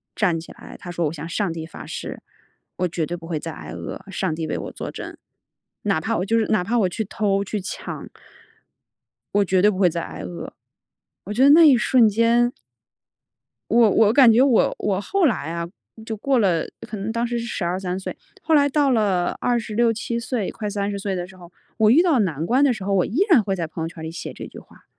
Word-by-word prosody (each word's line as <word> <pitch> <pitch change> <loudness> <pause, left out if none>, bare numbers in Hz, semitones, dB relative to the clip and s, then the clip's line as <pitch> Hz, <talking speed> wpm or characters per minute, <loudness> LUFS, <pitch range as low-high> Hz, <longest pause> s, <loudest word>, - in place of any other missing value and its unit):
站 175 -7 +1
起 165 - -11
来， - - -12
她 180 - -9
说： 175 -1 -1
“我 150 - -4
向 155 +1 -7
上 185 -2 -1
帝 160 -1 -6
发 - - -10
誓， - - -6 0.6
我 180 - 0
绝 165 -1 -2
对 175 +3 -4
不 165 - -11
会 160 -3 -2
再 165 - -6
挨 - - -10
饿， - - -7
上 190 -3 -1
帝 160 -1 -4
为 - - -2
我 - - -6
作 - - -6
证。 - - -8 0.7
哪 195 -6 +1
怕 225 +5 -1
我 185 - -1
就 225 +3 +1
是 220 - 0
哪 215 -5 +2
怕 230 +6 0
我 190 - +2
去 220 +5 -3
偷、 200 -1 0
去 205 +1 -4
抢 190 - -6 1.3
我 205 - +5
绝 185 0 +2
对 210 - +6
不 190 - -3
会 185 -2 +4
再 170 0 -3
挨 - - -7
饿。” 85 -1 -7 0.7
我 210 - -4
觉 245 +5 +3
得 280 - +7
那 315 +2 +8
一 270 - +7
瞬 240 -1 +4
间 230 +3 +3 1.2
我 230 -1 +5
我 215 +2 +4
感 255 -4 +7
觉 235 +3 +5
我 265 -5 +3
我 200 -1 -1
后 390 - +1
来 165 - 0
啊， 170 0 -3 0.4
就 220 -1 -4
过 265 +4 +1
了 180 -7 +2 0.2
可 215 - -6
能 200 +3 -3
当 235 +1 -1
时 240 0 -2
是 235 - -4
12-13 185 -2 -3
岁。 190 - -6 0.3
后 320 - 0
来 285 -1 +5
到 280 -1 +2
了 195 -6 +1
26-27 235 0 0
岁， 235 -4 -2
快 210 -2 -5
30 200 0 -2
岁 195 -1 -2
的 175 0 -4
时 190 - -15
候， 175 -1 -14 0.3
我 220 -2 +4
遇 285 +9 +6
到 325 -9 +3
难 165 -6 -1
关 260 +7 +3
的 280 - +4
时 200 - -7
候， 200 +1 -1
我 185 -2 +3
依 235 - -4
然 270 -11 +6
会 195 -1 -1
在 170 -3 -2
朋 160 +1 -6
友 165 - -2
圈 165 -1 -10
儿 - - -7
里 160 - -5
写 165 - -6
这 - - -8
句 - - -11
话。 - - -20
205 Hz, 245 characters per minute, -22 LUFS, 175-235 Hz, 1.3 s, 那